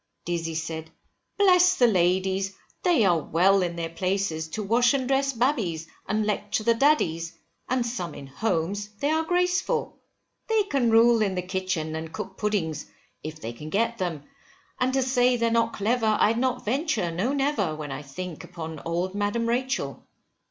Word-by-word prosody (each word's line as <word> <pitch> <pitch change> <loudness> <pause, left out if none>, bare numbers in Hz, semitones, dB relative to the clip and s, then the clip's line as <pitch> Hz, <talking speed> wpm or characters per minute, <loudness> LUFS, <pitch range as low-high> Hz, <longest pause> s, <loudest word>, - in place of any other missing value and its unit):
Dizzy 165 -1 -2
said, 160 0 -4 0.5
bless 365 -2 +5
the 245 - +4
ladies, 190 -1 +1 0.3
they 340 - +3
are 175 -3 +4
well 190 +6 +3
in 175 -1 -1
their 170 -1 -3
places, 185 -3 -1
to 210 +7 -4
wash 235 +5 +3
and 260 -2 -1
dress 275 +1 +2
babbies, 225 - 0 0.2
and 215 +2 0
lecture 210 0 -1
the 230 +1 +4
daddies; 175 - +1 0.3
and 255 -1 +1
some 180 -9 -4
in 140 - -8
homes 200 +6 -2
they 285 +2 +1
are 320 +1 +2
graceful. 360 +7 0 0.5
They 445 -2 +3
can 275 - +1
rule 230 0 +5
in 195 -3 +1
the 180 - -2
kitchen, 180 -4 -2
and 160 0 -5
cook 195 -1 -6
puddings 185 - -2 0.3
if 155 0 -7
they 115 -5 -5
can 150 +6 -9
get 230 +5 0
them, 165 -6 -3 0.6
and 255 +1 +2
to 265 -1 +2
say 250 -1 +3
they're 230 0 +1
not 230 0 +2
clever, 220 +1 +1
I'd 225 +2 +3
not 255 0 -1
venture, 235 - 0
no, 190 +10 -1
never! 270 - 0
when 150 -2 -6
I 135 +2 -5
think 165 +4 -7
upon 160 -3 -7
old 175 +3 -2
Madam 205 +3 -1
Rachel. 240 - -1
205 Hz, 175 wpm, -26 LUFS, 170-245 Hz, 0.6 s, bless